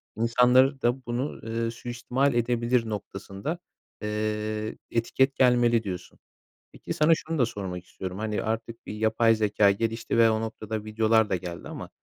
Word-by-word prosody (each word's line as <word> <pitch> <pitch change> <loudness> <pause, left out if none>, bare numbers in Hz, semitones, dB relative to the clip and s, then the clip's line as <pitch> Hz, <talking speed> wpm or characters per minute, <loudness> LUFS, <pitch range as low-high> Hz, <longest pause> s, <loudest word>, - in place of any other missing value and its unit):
insanları 125 +4 +4
da 125 +2 0
bunu, 120 +4 -1
ııı, 115 0 -2
suistimal 120 +3 -1
edebilir 120 0 +1
noktasında, 100 - -5 0.4
eee, 105 0 -2 0.2
etiket 130 +4 +1
gelmeli 120 -2 +4
diyorsun. 90 -4 -7 0.5
Peki, - - -6
sana 155 +2 +3
şunu 160 0 -4
da 125 - +5
sormak 95 -5 -6
istiyorum: 95 0 -7
Hani, 105 0 -2
artık 115 +1 -4
bir - - -6
yapay 110 +1 +3
zekâ 105 -2 +3
gelişti 115 +3 -2
ve 115 -1 +6
o 110 0 +1
noktada 110 -1 -4
videolar 110 0 +2
da - - +1
geldi 85 -1 -6
ama - - -7
115 Hz, 150 wpm, -27 LUFS, 105-120 Hz, 0.5 s, ve